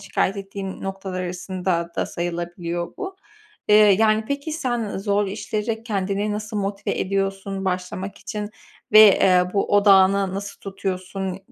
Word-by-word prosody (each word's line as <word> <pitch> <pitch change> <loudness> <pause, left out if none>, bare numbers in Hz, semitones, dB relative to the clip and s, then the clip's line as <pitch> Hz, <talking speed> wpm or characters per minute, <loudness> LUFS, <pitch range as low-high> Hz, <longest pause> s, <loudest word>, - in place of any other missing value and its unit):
şikâyet 195 +2 -1
ettiği 195 -1 -6
noktalar 195 -1 -4
arasında 180 -1 -2
da - - 0
sayılabiliyor 175 0 -4
bu. 385 -1 -6 0.5
Eee, 210 - +7
yani 215 +1 +5
peki 280 +3 -3
sen 240 - -2
zor 205 0 +1
işlere 215 +2 -3
kendini 205 -1 -1
nasıl 215 +1 -4
motive 200 0 -2
ediyorsun 195 0 -2
başlamak 185 +1 -3
için 210 0 -5 0.4
ve, 215 - +10 0.2
eee, 180 -1 +5
bu 200 - +1
odağını 195 -1 +5
nasıl 200 0 -6
tutuyorsun? 190 -1 -4
195 Hz, 130 wpm, -23 LUFS, 185-210 Hz, 0.5 s, ve